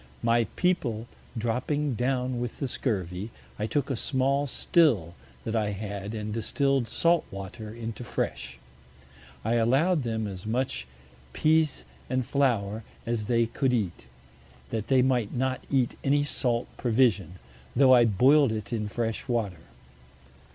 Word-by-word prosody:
My 115 0 +3
People 125 -12 0 0.3
dropping 130 +5 -1
down 125 +1 -1
with 120 -1 -4
the 140 - -2
Scurvy, 100 -5 -2 0.3
I 105 - -1
took 140 +2 -1
a - - 0
small 135 +4 0
Still 125 - +2 0.3
that 110 - -3
I 105 -2 0
had, 100 +1 -5
and 105 -1 -4
distill'd 135 +3 +1
Salt 170 +6 +2
Water 100 +3 -7
into 115 +1 -6
Fresh. 65 - -3 0.9
I 115 +2 +2
allow'd 140 +9 +3
them 110 -3 -2
as 95 0 -6
much 120 - -1 0.5
Pease 155 - +2 0.2
and 130 -1 0
Flower 115 -6 +1 0.2
as 115 -2 -1
they 115 +1 +2
could 125 +3 0
eat, 95 - -2 0.6
that 110 -2 -2
they 130 -2 +4
might 125 -5 +1
not 130 +1 -1
eat 130 -4 +1
any 145 +1 +3
Salt 120 -4 -1
Provision, 110 -7 +2 0.4
tho' 135 -2 +6
I 120 -2 +7
boil'd 130 +6 +5
it 110 +1 -4
in 105 -2 -1
fresh 115 +1 -3
Water. 105 -9 -1
120 Hz, 140 wpm, -27 LUFS, 110-135 Hz, 0.9 s, I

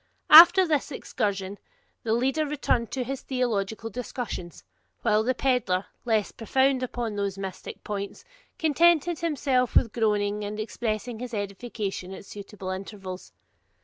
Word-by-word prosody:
After 345 +4 +10
this 300 -2 0
excursion 200 -6 -3 0.4
the 225 - -1
leader 270 +6 +1
returned 280 -6 -1
to 260 - -2
his 270 +2 -5
theological 225 -4 -2
discussions, 235 -7 -6 0.4
while 215 -2 +3
the 250 +3 0
pedlar, 235 -9 +1 0.2
less 220 -3 +1
profound 265 +3 +1
upon 240 -3 -3
those 200 -1 -2
mystic 190 -2 -7
points, 200 -1 -5 0.3
contented 335 +1 +3
himself 275 -6 0
with 230 - +4
groaning 210 -2 0
and 210 +1 -5
expressing 220 +1 -3
his 245 -1 -5
edification 200 -2 -5
at - - -11
suitable 200 -1 -8
intervals. 190 -1 -7
225 Hz, 130 wpm, -26 LUFS, 200-260 Hz, 0.4 s, After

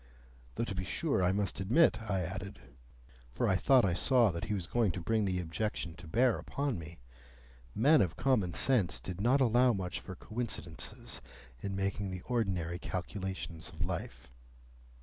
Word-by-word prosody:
Though - - -1
to 115 - -3
be 95 -1 -2
sure 90 +1 0
I 90 - +4
must 100 0 -1
admit, 120 - +4
I 95 -2 +1
added 95 -3 -6 0.7
(for - - -1
I 95 - +3
thought 130 +4 +5
I 90 - +2
saw 120 +3 +4
that 85 0 -4
he 105 - -1
was 95 -4 -3
going 115 0 +2
to 90 - -4
bring 105 +5 +1
the 90 -2 0
objection 85 0 -3
to 85 -1 -11
bear 120 +8 +3
upon 140 -8 -2
me), 85 +1 -9 0.8
men 145 +7 +5
of 90 -4 0
common 105 -11 +1
sense 100 - +2
did 90 +8 -6
not 130 +5 +4
allow 125 0 +5
much 95 -3 -3
for 95 - -8
coincidences 110 -6 -5 0.4
in 100 -1 -3
making 100 0 -1
the 90 -1 -5
ordinary 95 -8 -1
calculations 95 -4 -5
of 85 -1 -4
life. 90 -2 -5
95 Hz, 170 wpm, -32 LUFS, 90-115 Hz, 0.8 s, thought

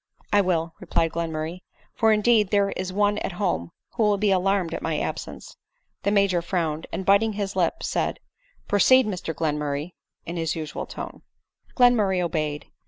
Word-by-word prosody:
" - - -32
1 205 -1 +5
will," 165 -3 0
replied 165 -1 0
Glenmurray; 165 +1 -3 0.2
" - - -34
for 225 -1 +3
indeed 215 -1 +3
there 200 -1 +2
is 185 0 -4
one 205 +2 +1
at - - -4
home 175 - -1 0.2
who - - -4
will 210 -2 +3
be 205 0 +2
alarmed 190 -2 +1
at - - -4
my 160 -1 -1
absence." - - -5
4 - - -21 0.4
The 200 - 0
Major 200 -4 +3
frowned; 165 -3 -2
and, 190 - -4
biting 200 +3 +4
his 200 -1 -3
lip, 180 -3 0
said, - - -1 0.2
" - - -37
Pro 205 - +1
ceed, 260 +4 +6
Mr 185 -5 -3
Glenmurray," 150 0 -2 0.3
in 170 +1 -5
his 165 0 -1
usual 155 -2 -5
tone. - - -8 0.5
Glenmurray 220 -7 +4
obeyed. 155 -4 -2
185 Hz, 185 wpm, -25 LUFS, 165-205 Hz, 0.5 s, ceed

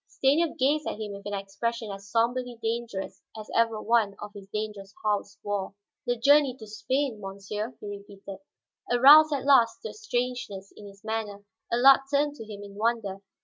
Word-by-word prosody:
Stanief 320 -2 +1
gazed 290 +4 +1
at - - -4
him 215 -1 -5
with 200 +1 -9
an 205 - -3
expression 205 +3 -4
as 200 0 -9
somberly 240 +2 0
dangerous 225 -5 -4 0.2
as 215 - -9
ever 230 -1 +2
one 220 -3 +1
of 210 - -8
his 200 -1 -11
dangerous 210 -2 -5
house 205 -1 -1
wore. 200 -1 -3 0.3
"The 245 0 +1
journey 280 +1 +4
to 220 - -10
Spain, 220 +4 -2
monsieur?" 205 +4 -6
he - - -10
repeated. 200 -1 -9 0.5
Aroused 290 +6 +8
at 280 -2 -2
last 265 - +4
to 460 - -4
a - - -9
strangeness 245 - -4
in 205 - -11
his 200 0 -15
manner, 210 -2 -4 0.3
Allard 265 +3 +7
turned 290 +1 +2
to 220 -3 -9
him 205 -1 -8
in 200 -1 -11
wonder. 215 -3 -1
220 Hz, 180 wpm, -27 LUFS, 200-250 Hz, 0.5 s, Aroused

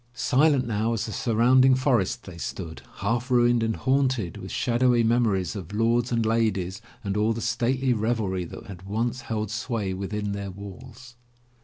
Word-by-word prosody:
Silent 135 +2 +3
now 110 0 0
as 115 -1 -1
the 110 - -6
surrounding 125 +4 +4
for 130 -3 +3
est 95 - -4
they 90 - -9
stood, 80 -1 -6 0.2
half 115 +5 -1
ruined, 120 -1 +4
and 110 -1 0
haunted 130 - 0
with - - -8
shadowy 120 0 +2
memories 110 -5 +1
of 95 -2 -7
lords 115 +2 +2
and 115 -2 +1
ladies 110 -3 0 0.2
and 100 -1 -2
all 105 +2 +2
the 115 - -5
stately 125 +3 +1
revelry 110 -5 -1
that 85 - -9
had 95 -3 -9
once 115 +6 -2
held 110 -3 -3
sway 110 -4 -2
within 100 +2 -3
their 100 -1 -4
walls. 115 +6 -11
115 Hz, 170 wpm, -26 LUFS, 100-120 Hz, 0.2 s, surrounding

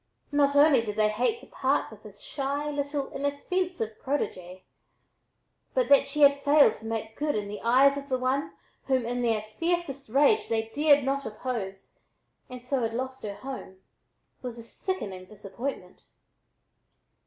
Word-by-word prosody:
Not 285 -1 +3
only 285 -3 +6
did 210 -2 -5
they 215 0 +3
hate 250 - 0
to - - -12
part - - 0
with - - -13
this - - -13
shy, 285 +1 -3
little, 285 -1 -3
inoffensive 285 - -2
protégée, 185 -10 -3 1.1
but - - +2
that 275 -1 +6
she 300 +2 -3
had 280 0 +7
failed 285 -3 +5
to 225 - -9
"make 225 0 -4
good" 295 0 -1
in 210 -1 -2
the 210 +1 -7
eyes 270 +4 +4
of 280 +1 -11
the 260 - +1
one 260 +3 -1 0.4
whom, 260 -3 +1
in 245 +1 -2
their 225 -3 +1
fiercest 275 +3 -3
rage 285 - +3
they 225 -1 -1
dared 290 +2 +4
not 275 -2 -1
oppose, 210 -4 -5 0.5
and 250 -1 -9
so 255 +1 -1
had 225 0 -1
lost 260 +1 -4
her 205 -2 -5
home, 255 -8 -8 0.6
was 245 -2 -6
a 230 - -8
sickening 210 - -5
disappointment. 210 +7 -7
260 Hz, 160 wpm, -27 LUFS, 220-285 Hz, 1.1 s, had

